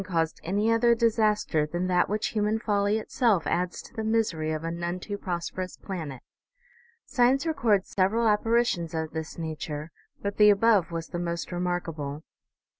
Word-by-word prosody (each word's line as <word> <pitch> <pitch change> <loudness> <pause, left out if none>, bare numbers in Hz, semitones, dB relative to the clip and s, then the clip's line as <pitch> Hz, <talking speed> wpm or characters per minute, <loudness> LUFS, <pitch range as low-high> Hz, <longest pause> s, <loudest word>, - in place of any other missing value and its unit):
caused 165 -4 -1
any 205 +6 +1
other 235 +1 +4
disaster 215 -8 +2
than 175 +4 -2
that 180 -1 +2
which 210 +1 0
human 215 0 0
folly 205 -1 +1
itself 220 -5 +1
adds 175 +1 -1
to - - -15
the 220 -2 -4
misery 215 -9 0
of 155 0 -3
a 165 - -2
none 170 +1 -3
too 205 +2 -5
prosperous 185 -1 -4
planet. 160 -10 -6 0.8
Science 260 +3 +2
records 225 - +1
several 215 +5 +2
apparitions 210 -6 +1
of 160 -1 -2
this 160 0 -5
nature, 155 -1 -5 0.3
but 200 0 -4
the 210 0 +7
above 205 -3 +4
was 165 -1 -4
the 175 - -4
most 170 0 -3
remarkable. 165 -5 -3
185 Hz, 160 wpm, -27 LUFS, 165-220 Hz, 0.8 s, the